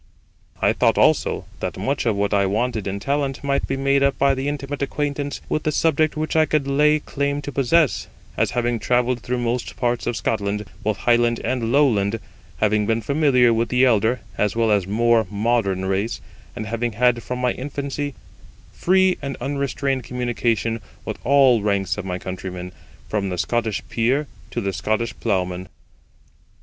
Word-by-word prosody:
I - - +4
thought - - +2
also, - - +2
that - - -4
much 135 -2 -1
of 110 - +2
what 100 +1 0
I 100 -1 +3
wanted 110 +1 -1
in 100 +1 -3
talent 140 +3 -1
might 140 0 0
be 135 - -2
made 140 0 +2
up 140 0 +2
by 140 0 +3
the 135 +1 -3
intimate 145 0 -4
acquaintance 145 0 -2
with 155 - -1
the 155 - 0
subject 155 0 +2
which 155 +1 -2
I 155 -1 +4
could 150 -3 0
lay 150 +2 +4
claim 140 -1 -2
to 145 - -5
possess, 140 +2 +2 0.3
as - - +1
having 120 -1 +1
travelled 125 +2 +1
through 125 +2 -3
most 120 0 -2
parts 120 -1 -1
of 120 -1 -1
Scotland, 105 -1 -1 0.2
both 105 -1 -1
Highland 120 0 +2
and 120 -3 -1
Lowland, 115 -7 +3 0.4
having 105 -1 +2
been 115 0 +1
familiar 135 -4 +3
with 115 +1 0
the 125 +1 +4
elder 115 0 +2 0.2
as 105 0 +1
well 115 -1 +2
as 100 -3 +2
more 115 +1 +3
modern 100 -3 0
race, 95 +4 -1 0.4
and 110 -3 -4
having 115 +1 -2
had 120 +1 +2
from 125 +2 -4
my 125 0 +1
infancy 140 +1 -4 0.6
free 185 0 +3
and 140 -1 -4
unrestrained 140 -1 -1
communication 115 -2 -1 0.2
with - - -5
all 135 -4 +5
ranks 100 -2 0
of 100 - -5
my 90 -1 -2
countrymen, 90 -1 -6 0.4
from 100 -2 -1
the 90 - -3
Scottish 110 +2 -1
peer 130 +6 +1 0.2
to - - -3
the 100 -1 -2
Scottish 110 +5 -1
plough 95 -5 +1
man. 90 0 -7
120 Hz, 175 wpm, -22 LUFS, 105-140 Hz, 0.6 s, all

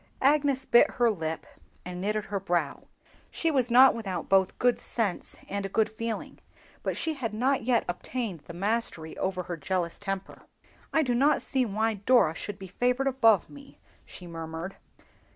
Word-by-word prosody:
Agnes 280 -1 +3
bit 240 - +6
her 240 -2 +3
lip 160 -5 -4 0.4
and 180 0 -6
knitted 210 +1 -1
her 200 -1 -3
brow. 175 -6 -2 0.4
She 330 - -1
was 255 -4 +1
not 255 +3 +7
without 205 -5 -4
both 190 -1 +3
good 245 -1 +2
sense 215 -6 -2
and 195 -1 -3
good 220 0 +2
feeling, 225 +1 -5 0.4
but - - -2
she 320 - -1
had 235 -7 -4
not 255 +1 +1
yet 240 -2 +2
obtained 195 +1 -4
the 170 - -9
mastery 195 -5 -1
over 185 -1 -1
her 175 -1 -5
jealous 170 +1 -2
temper. 195 -1 -5 0.5
"I 320 - +3
do 250 -3 0
not 280 +5 +3
see 260 -2 0
why 220 +2 0
Dora 210 -4 +3
should 200 +4 -6
be 195 - -9
favored 250 +8 0
above 230 -8 +4
me," 280 -1 -14 0.3
she 180 - -11
murmured. 165 +2 -6
215 Hz, 170 wpm, -28 LUFS, 185-250 Hz, 0.5 s, not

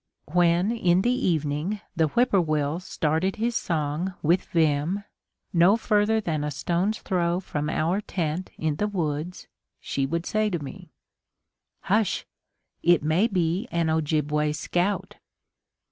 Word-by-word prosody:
When 175 +3 +3
in 185 -5 +2
the 245 - +3
evening 165 - -1 0.2
the 160 -2 +3
whippoorwill 160 - +1
started 165 +1 -1
his 230 +2 -1
song 160 +2 -1
with 170 +4 +2
vim, 160 +4 +1 0.5
no 180 +5 +5
further 215 0 +2
than 160 -8 -2
a 150 - -1
stone's 175 +9 -1
throw 175 -1 0
from 150 -5 -3
our 170 +6 0
tent 175 -2 -3
in 155 -2 -1
the 210 - 0
woods, 170 -3 -3 0.3
she 135 -1 -2
would 170 +3 -2
say 215 0 +1
to 180 - -1
me: 170 +4 -9 0.9
"Hush! 210 0 +1 0.6
It 175 -3 +4
may 160 +8 +3
be 185 +2 0
an 165 -1 0
Ojibway 150 -1 +1
scout!" 175 +6 -1
170 Hz, 130 wpm, -25 LUFS, 155-195 Hz, 0.9 s, no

